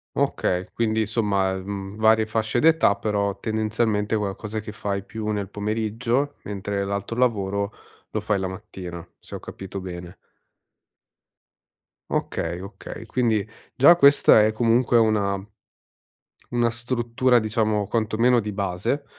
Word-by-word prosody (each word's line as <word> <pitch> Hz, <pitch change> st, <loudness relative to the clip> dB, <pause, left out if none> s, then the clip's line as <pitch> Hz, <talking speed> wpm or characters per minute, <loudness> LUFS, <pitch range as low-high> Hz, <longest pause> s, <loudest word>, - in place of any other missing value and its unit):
Okay, 90 Hz, 0 st, 0 dB
quindi 110 Hz, -1 st, 0 dB
insomma, 105 Hz, -3 st, +1 dB
mhmm, 95 Hz, +1 st, -6 dB
varie 110 Hz, 0 st, +4 dB
fasce 110 Hz, +2 st, 0 dB
d'età 160 Hz, -8 st, +4 dB
però 100 Hz, -1 st, -1 dB
tendenzialmente 110 Hz, -1 st, 0 dB
qualcosa 105 Hz, +1 st, -3 dB
che 105 Hz, 0 st, -7 dB
fai 100 Hz, -2 st, -3 dB
più 110 Hz, +1 st, -5 dB
nel 105 Hz, -2 st, -2 dB
pomeriggio, 115 Hz, +6 st, -1 dB
mentre 100 Hz, 0 st, -3 dB
l'altro 100 Hz, +3 st, -3 dB
lavoro 100 Hz, -4 st, 0 dB, 0.4 s
lo 110 Hz, -, -2 dB
fai 105 Hz, -1 st, 0 dB
la 95 Hz, -, -2 dB
mattina, 95 Hz, -3 st, -8 dB, 0.2 s
se -, -, -14 dB
ho -, -, -4 dB
capito 95 Hz, 0 st, -8 dB
bene. 90 Hz, -1 st, -8 dB, 1.9 s
Okay, 85 Hz, +1 st, -2 dB
okay, 100 Hz, +3 st, -9 dB
quindi 110 Hz, -3 st, 0 dB, 0.3 s
già 140 Hz, +7 st, +7 dB
questa 140 Hz, -8 st, +6 dB
è 110 Hz, -, +2 dB
comunque 120 Hz, +2 st, +3 dB
una 105 Hz, -3 st, +2 dB, 1.1 s
una 120 Hz, -1 st, +2 dB
struttura 120 Hz, +1 st, +1 dB
diciamo 110 Hz, -2 st, 0 dB
quantomeno 115 Hz, +2 st, +2 dB
di 105 Hz, -1 st, -4 dB
base, 100 Hz, +8 st, -2 dB
110 Hz, 125 wpm, -24 LUFS, 100-115 Hz, 1.9 s, già